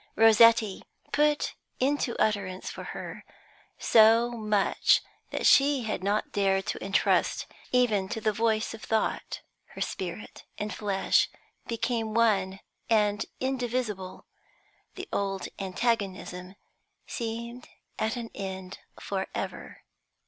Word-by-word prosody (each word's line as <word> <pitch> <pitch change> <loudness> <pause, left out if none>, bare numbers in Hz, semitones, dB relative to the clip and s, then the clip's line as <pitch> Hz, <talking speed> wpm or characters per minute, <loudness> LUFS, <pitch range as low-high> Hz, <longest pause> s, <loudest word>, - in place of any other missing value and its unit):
Rossetti 225 -2 +6 0.3
put 295 0 +2 0.3
into 270 -2 0
utterance 195 -3 -1
for - - -8
her - - -7 0.5
so 230 +2 +5
much 215 -4 +2 0.3
that - - -3
she 275 -2 +5
had 215 -4 -3
not 205 +2 0
dared 195 -1 +1
to - - -4
entrust 195 +1 +1 0.3
even 220 -7 +2
to 220 - -3
the 215 0 0
voice 220 +1 0
of 225 - -9
thought. 220 -1 -1 0.3
Her - - -7
spirit - - -5
and 210 0 -3
flesh 200 -2 +1 0.4
became 230 -1 -2
one 195 -5 +2 0.3
and 210 -2 +2
indivisible; 245 -7 -3 0.7
the - - -7
old 195 -1 -2
antagonism 190 -2 -2 0.5
seemed 235 0 -5 0.3
at 220 +2 0
an 235 -2 -6
end 190 -1 -6 0.2
for - - -3
ever. - - -6
220 Hz, 110 wpm, -28 LUFS, 195-235 Hz, 0.7 s, Rossetti